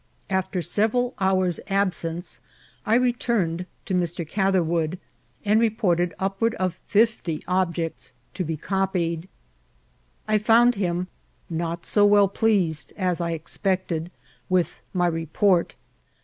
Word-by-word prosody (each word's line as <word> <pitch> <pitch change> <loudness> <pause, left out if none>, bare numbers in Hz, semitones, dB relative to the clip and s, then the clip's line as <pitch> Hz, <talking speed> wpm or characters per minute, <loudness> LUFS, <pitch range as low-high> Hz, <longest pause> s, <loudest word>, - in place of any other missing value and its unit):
After 190 -1 -1
several 245 +6 +2
hoars' 185 -2 +1
absenee 180 -3 -1 0.5
I 220 - +4
returned 235 - 0 0.2
to 195 - -3
Mr. 175 -2 -1
Catherwoodi 175 -3 +1 0.5
and 210 +2 +4
reported 185 -6 +1
upward 195 +4 0
of 185 -2 -2
fifty 205 -7 +1
objects 170 -8 -1 0.2
to 185 - -2
be 160 -1 -3
eqpied. 180 -2 -1 1.0
I 215 0 +3
found 235 +3 +5
him 180 -3 -1 0.4
not 170 0 -3
so 205 - +4
well 205 -1 +6
pleased 195 -8 0
as 180 -3 0
I 170 0 -1
expeeted 175 0 -2 0.4
with 185 -2 +1
my 180 -2 +1
report. 170 +2 +1
185 Hz, 115 wpm, -24 LUFS, 170-205 Hz, 1.0 s, well